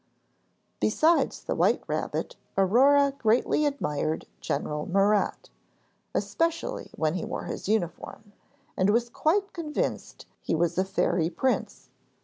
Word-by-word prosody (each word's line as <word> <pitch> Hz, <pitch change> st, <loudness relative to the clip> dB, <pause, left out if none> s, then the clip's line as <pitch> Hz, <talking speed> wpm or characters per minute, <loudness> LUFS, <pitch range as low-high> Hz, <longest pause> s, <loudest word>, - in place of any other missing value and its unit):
Besides 315 Hz, +10 st, +2 dB
the -, -, -2 dB
white -, -, +2 dB
rabbit, -, -, -3 dB, 0.2 s
Aurore 275 Hz, +9 st, +5 dB
greatly 240 Hz, +6 st, +2 dB
admired 160 Hz, -, -2 dB
General 150 Hz, +1 st, -3 dB
Murat 200 Hz, +2 st, +1 dB, 0.6 s
(especially 335 Hz, +9 st, -1 dB
when 155 Hz, -1 st, 0 dB
he 185 Hz, -, -3 dB
wore -, -, -4 dB
his -, -, -5 dB
uniform) 205 Hz, +1 st, -3 dB, 0.4 s
and 190 Hz, +2 st, +2 dB
was 235 Hz, +3 st, +2 dB
quite 390 Hz, +10 st, 0 dB
convinced 310 Hz, -4 st, -3 dB, 0.2 s
he -, -, -1 dB
was 170 Hz, +2 st, 0 dB
a 190 Hz, -, +2 dB
fairy 180 Hz, -3 st, +1 dB
prince. 260 Hz, +7 st, -2 dB
215 Hz, 120 wpm, -27 LUFS, 180-285 Hz, 0.6 s, Aurore